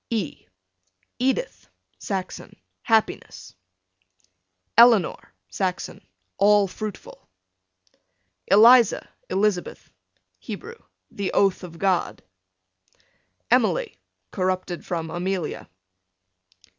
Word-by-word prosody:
E 210 - -4 0.7
Edith, 265 - -2 0.3
Saxon, 190 -2 -5 0.3
happiness. 225 -2 -1 1.2
Eleanor, 230 -6 +4 0.2
Saxon, 180 - -4 0.4
all 205 0 +5
fruitful. 210 - -9 1.2
Eliza, 230 +3 +6 0.2
Elizabeth, 200 -3 -1 0.5
Hebrew, 470 +1 -8 0.3
the 200 -1 -3
oath 195 -1 +2
of 170 -2 -10
God. 190 -1 -1 1.3
Emily, - - +2 0.4
corrupted 185 -1 -2
from 165 -2 -4
Amelia. 180 -1 -4
195 Hz, 70 wpm, -23 LUFS, 180-220 Hz, 1.3 s, Eliza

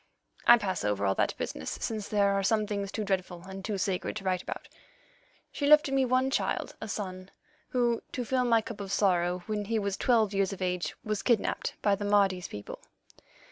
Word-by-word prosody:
I 240 - +10
pass 195 - -2
over 105 -1 0
all 95 - +3
that - - 0
business, - - -4
since 215 -3 -3
there 200 -1 +3
are 195 - +1
some 215 +2 +2
things 200 -1 -3
too 215 - -3
dreadful 185 -3 -2
and 190 0 -8
too 205 0 -2
sacred 190 -1 -1
to 215 - -5
write 185 -2 0
about. - - -6 0.8
She 285 - -1
left 300 -2 +6
me 270 -1 +3
one 255 +1 +2
child, - - -1
a 220 - -4
son, 185 -3 -5 0.4
who, 240 -2 +1
to 250 - -2
fill 260 +2 0
up 250 - +1
my 230 -1 +4
cup 225 -2 -7
of 195 -1 -6
sorrow, 180 -3 +2
when 210 -1 -2
he 225 +2 0
was 200 -2 -1
twelve 220 -5 +3
years 195 0 +1
of 195 - -8
age, 180 -3 -2
was 215 -1 -2
kidnapped 235 -4 0
by 205 - +4
the 205 +1 -2
Mardi's 195 -3 +2
people. 105 0 -8
200 Hz, 210 wpm, -29 LUFS, 185-225 Hz, 0.8 s, I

